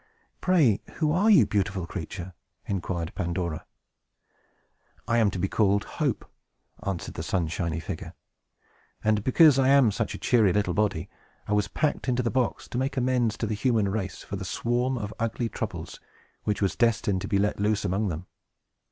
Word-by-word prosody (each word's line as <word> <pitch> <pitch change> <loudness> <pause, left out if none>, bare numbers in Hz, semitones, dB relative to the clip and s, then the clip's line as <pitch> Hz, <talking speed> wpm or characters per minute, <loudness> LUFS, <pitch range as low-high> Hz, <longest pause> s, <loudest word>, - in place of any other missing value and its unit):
"Pray, 155 - +3
who 155 -2 +1
are 195 +7 +3
you, 180 - +7
beautiful 100 -3 -1
creature?" 90 +1 -6 0.3
inquired 90 -3 -3
Pandora. 85 -2 -3 1.4
"I 120 -1 +3
am 110 -3 +4
to 95 - -5
be 95 - 0
called 100 0 +2
Hope!" - - -2 0.5
answered 100 -4 -4
the - - -5
sunshiny 85 -2 -1
figure. - - -6 0.9
"And 105 -1 +2
because 140 +2 +6
I 130 - +4
am 135 -5 +6
such - - -2
a - - -5
cheery 110 -7 +3
little 100 -3 +1
body, 100 -4 0 0.4
I 105 - 0
was 105 -1 +2
packed 145 +4 -1
into 125 0 +1
the 115 - 0
box, 125 -2 -1
to 120 - -2
make 135 +1 -2
amends 125 -3 +1
to - - -1
the 110 - -2
human 110 -2 +1
race 95 -1 -3
for 100 - -5
that 95 - -6
swarm 120 +6 0
of 105 -2 -4
ugly 115 +1 -1
Troubles, - - -5 0.5
which 105 -1 0
was 95 - +1
destined 105 -5 +1
to - - -4
be 100 - +1
let 105 +1 0
loose 105 +1 +1
among 100 +4 0
them. 85 0 -4
105 Hz, 175 wpm, -27 LUFS, 95-120 Hz, 1.4 s, you